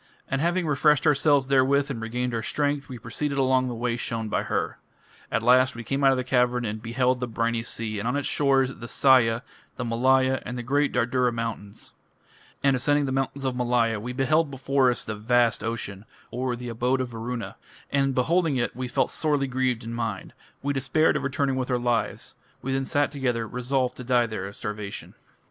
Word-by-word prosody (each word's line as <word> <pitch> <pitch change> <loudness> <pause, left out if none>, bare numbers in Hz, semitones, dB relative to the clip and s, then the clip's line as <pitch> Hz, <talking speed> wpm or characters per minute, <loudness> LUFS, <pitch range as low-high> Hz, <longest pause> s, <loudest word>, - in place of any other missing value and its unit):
And 135 +1 -1
having 175 +2 +1
refreshed 150 0 +3
ourselves 145 -2 +4
therewith 140 +1 +3
and 115 -4 -5
regained 125 +2 -2
our 115 - -1
strength, 145 +3 -1
we 125 - -6
proceeded 140 +6 -3
along 130 -1 +2
the 120 - -4
way 120 0 -1
shown 115 -2 -3
by - - 0
her. - - -2 0.5
At 115 - 0
last 130 +1 +4
we 115 - -6
came 135 +3 -2
out 135 - +7
of 135 - +3
the 130 - -1
cavern 125 -1 +1
and 110 0 -4
beheld 125 +2 0
the 125 - -2
briny 115 0 -1
sea, 115 -2 -3
and 110 - -3
on 125 - 0
its 145 - -1
shores, 135 -2 +2
the 120 - -7
Sahya, 120 -3 +4 0.3
the 125 - -4
Malaya, 130 +3 +2
and 125 - -5
the 120 - -4
great 145 +4 +1
Dardura 125 0 +1
mountains. 115 -3 -5 0.7
And 140 -1 +4
ascending 145 +3 +2
the 135 - -2
mountains 135 +1 -2
of 130 -1 -1
Malaya, 120 -3 +1
we 120 +4 -5
beheld 145 +5 +2
before 135 -1 +2
us 120 - -2
the 110 - -3
vast 115 +2 +2
ocean 110 -3 -4 0.3
(or, 125 0 -2
"the 120 0 -7
abode 125 +3 0
of 130 -1 -2
Varuna"). 115 +1 -5 0.4
And 135 -1 +1
beholding 160 +2 +2
it, 120 - -1
we 130 0 -4
felt 125 - 0
sorely 145 -3 +1
grieved 130 -2 -1
in 115 +1 -6
mind.... 115 -5 -4 0.3
We 145 +1 0
despaired 135 +4 +2
of - - 0
returning 140 -1 0
with 130 0 -2
our 125 - +2
lives.... 120 -1 -1 0.3
We 135 - -2
then 135 0 0
sat 145 +2 +1
together, 125 -5 -1
resolved 125 +2 -1
to 125 - -7
die 120 -1 +3
there 110 -4 -5
of 100 - -10
starvation." 105 -1 -6
125 Hz, 205 wpm, -25 LUFS, 115-135 Hz, 0.7 s, out